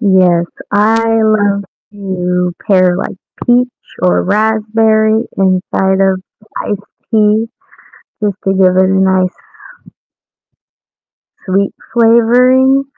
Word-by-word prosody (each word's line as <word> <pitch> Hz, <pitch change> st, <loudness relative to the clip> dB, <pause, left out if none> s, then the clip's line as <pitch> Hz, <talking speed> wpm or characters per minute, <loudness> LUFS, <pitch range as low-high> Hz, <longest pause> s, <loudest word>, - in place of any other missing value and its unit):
Yes, 185 Hz, -5 st, +3 dB, 0.3 s
I 215 Hz, +2 st, +2 dB, 0.2 s
love 205 Hz, -2 st, +1 dB, 0.3 s
to 180 Hz, -3 st, -2 dB
pair, 185 Hz, -3 st, +3 dB
like, 190 Hz, -, -5 dB, 0.3 s
peach 245 Hz, +1 st, +2 dB, 0.3 s
or 90 Hz, 0 st, +2 dB
raspberry 220 Hz, -, +1 dB
inside 190 Hz, 0 st, 0 dB
of 190 Hz, -1 st, 0 dB, 0.4 s
iced 205 Hz, -1 st, -3 dB, 0.3 s
tea 215 Hz, 0 st, +2 dB, 0.7 s
just 205 Hz, -2 st, -1 dB
to 195 Hz, -, +1 dB
give 185 Hz, -1 st, +3 dB
it 190 Hz, -, +4 dB
a 190 Hz, 0 st, +1 dB
nice 190 Hz, -1 st, +1 dB, 2.1 s
sweet 195 Hz, +1 st, 0 dB, 0.2 s
flavoring, 250 Hz, +4 st, +3 dB
205 Hz, 95 wpm, -13 LUFS, 185-220 Hz, 2.1 s, it